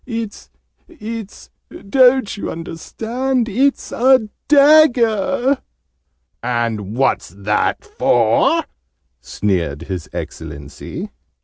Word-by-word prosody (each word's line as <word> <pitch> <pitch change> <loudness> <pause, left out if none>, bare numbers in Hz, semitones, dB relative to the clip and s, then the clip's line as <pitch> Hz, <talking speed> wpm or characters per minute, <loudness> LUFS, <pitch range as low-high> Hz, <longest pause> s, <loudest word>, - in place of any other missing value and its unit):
"It's 230 -4 -6 0.4
it's 225 - -8 0.2
don't 255 +1 +2
you 205 - -5
understand? 230 +10 -3
It's 260 +6 0
a 255 -3 +3 0.2
DAGGER!" 270 -4 +4 0.8
"And 115 -4 -2
what's 135 0 +1
that 100 +4 -1
for?" 120 - +2 0.6
sneered 85 +2 -2
His 90 -2 -6
Excellency. 70 0 -7
215 Hz, 80 wpm, -18 LUFS, -, 0.8 s, DAGGER